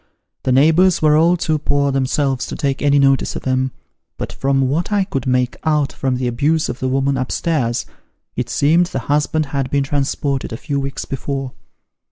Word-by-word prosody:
The 130 Hz, -, -1 dB
neighbours 160 Hz, +7 st, +4 dB
were 155 Hz, -1 st, +4 dB
all 170 Hz, +3 st, +4 dB
too 155 Hz, -2 st, 0 dB
poor 140 Hz, -1 st, +1 dB
themselves 135 Hz, 0 st, 0 dB
to -, -, -5 dB
take 140 Hz, -3 st, -2 dB
any 145 Hz, 0 st, +3 dB
notice 135 Hz, -1 st, +2 dB
of -, -, -6 dB
'em, 130 Hz, 0 st, +1 dB, 0.5 s
but -, -, -5 dB
from 135 Hz, -1 st, +1 dB
what 160 Hz, +9 st, -1 dB
I 205 Hz, -1 st, +2 dB
could 135 Hz, -9 st, -4 dB
make 125 Hz, -1 st, +1 dB
out 150 Hz, -3 st, +1 dB
from 130 Hz, -1 st, -1 dB
the 125 Hz, 0 st, -2 dB
abuse 150 Hz, +7 st, +1 dB
of 125 Hz, -, -5 dB
the 130 Hz, -, -1 dB
woman 135 Hz, +1 st, +1 dB
up 130 Hz, -1 st, -3 dB
stairs, 130 Hz, -9 st, -1 dB, 0.5 s
it -, -, -3 dB
seemed 165 Hz, +5 st, +3 dB
the 155 Hz, -, -4 dB, 0.2 s
husband 150 Hz, +1 st, +1 dB
had 135 Hz, -2 st, -1 dB
been 140 Hz, +1 st, +1 dB
transported 140 Hz, -1 st, -2 dB
a 115 Hz, -, -4 dB
few 140 Hz, +1 st, -3 dB
weeks 135 Hz, 0 st, -4 dB
before. 135 Hz, 0 st, -4 dB
140 Hz, 195 wpm, -18 LUFS, 130-150 Hz, 0.5 s, neighbours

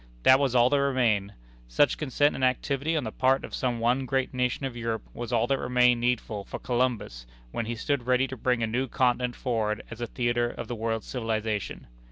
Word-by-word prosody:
That 130 Hz, +1 st, +7 dB
was 135 Hz, -3 st, +1 dB
all 120 Hz, 0 st, +6 dB
that 145 Hz, -1 st, +3 dB
remained. 115 Hz, -7 st, +1 dB, 0.3 s
Such -, -, +2 dB
consent 145 Hz, 0 st, +2 dB
and 130 Hz, -, -4 dB
activity 140 Hz, +4 st, 0 dB
on 150 Hz, -, -1 dB
the 110 Hz, -, -4 dB
part 130 Hz, +3 st, +2 dB
of -, -, -12 dB
some 125 Hz, -2 st, -1 dB
one 125 Hz, +3 st, +1 dB
great 130 Hz, +1 st, 0 dB
nation 125 Hz, +2 st, -1 dB
of 130 Hz, -3 st, -4 dB
Europe 115 Hz, -2 st, -3 dB
was 120 Hz, 0 st, -6 dB
all 115 Hz, -1 st, +2 dB
that 135 Hz, +2 st, 0 dB
remained 125 Hz, -1 st, +3 dB
needful 115 Hz, -4 st, -1 dB
for -, -, -7 dB
Columbus 120 Hz, -, -2 dB, 0.2 s
when 115 Hz, -, -3 dB
he 120 Hz, -, -2 dB
stood 125 Hz, +1 st, -2 dB
ready 130 Hz, +1 st, +3 dB
to 130 Hz, -, -6 dB
bring 125 Hz, -1 st, 0 dB
a -, -, +3 dB
new 125 Hz, +4 st, -1 dB
continent 125 Hz, 0 st, +1 dB
forward 110 Hz, -4 st, -1 dB
as 115 Hz, +1 st, -8 dB
a 120 Hz, -, -2 dB
theatre 120 Hz, 0 st, 0 dB
of -, -, -7 dB
the 120 Hz, -, -4 dB
world's 115 Hz, -1 st, -2 dB
civilization. 110 Hz, -4 st, -3 dB
125 Hz, 215 wpm, -27 LUFS, 115-130 Hz, 0.3 s, That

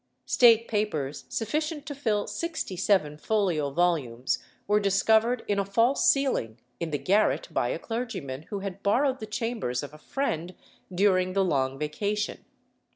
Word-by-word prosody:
State 230 Hz, -2 st, +5 dB
papers 160 Hz, -11 st, -2 dB
sufficient 300 Hz, +6 st, -2 dB
to 295 Hz, -, -5 dB
fill 220 Hz, -7 st, 0 dB
sixty 330 Hz, -, -4 dB
seven 175 Hz, -6 st, +1 dB
folio 180 Hz, -8 st, 0 dB
volumes 140 Hz, -7 st, 0 dB, 0.3 s
were 210 Hz, +1 st, +3 dB
discovered 220 Hz, +4 st, +2 dB
in 205 Hz, -1 st, +1 dB
a -, -, +2 dB
false 230 Hz, +7 st, +3 dB
ceiling 260 Hz, -, +1 dB, 0.2 s
in 170 Hz, -, -2 dB
the 150 Hz, -, -1 dB
garret 210 Hz, -, +2 dB
by -, -, 0 dB
a -, -, -1 dB
clergyman 225 Hz, -, -4 dB
who 200 Hz, -2 st, -4 dB
had 195 Hz, 0 st, -6 dB
borrowed 260 Hz, +6 st, +2 dB
the 215 Hz, -, -6 dB
chambers 220 Hz, -, -2 dB
of 145 Hz, 0 st, -8 dB
a 155 Hz, -, -13 dB
friend 180 Hz, -, -3 dB, 0.4 s
during 185 Hz, -1 st, +2 dB
the 195 Hz, 0 st, +2 dB
long 135 Hz, -5 st, 0 dB
vacation. 200 Hz, +8 st, -2 dB
200 Hz, 155 wpm, -27 LUFS, 155-230 Hz, 0.4 s, State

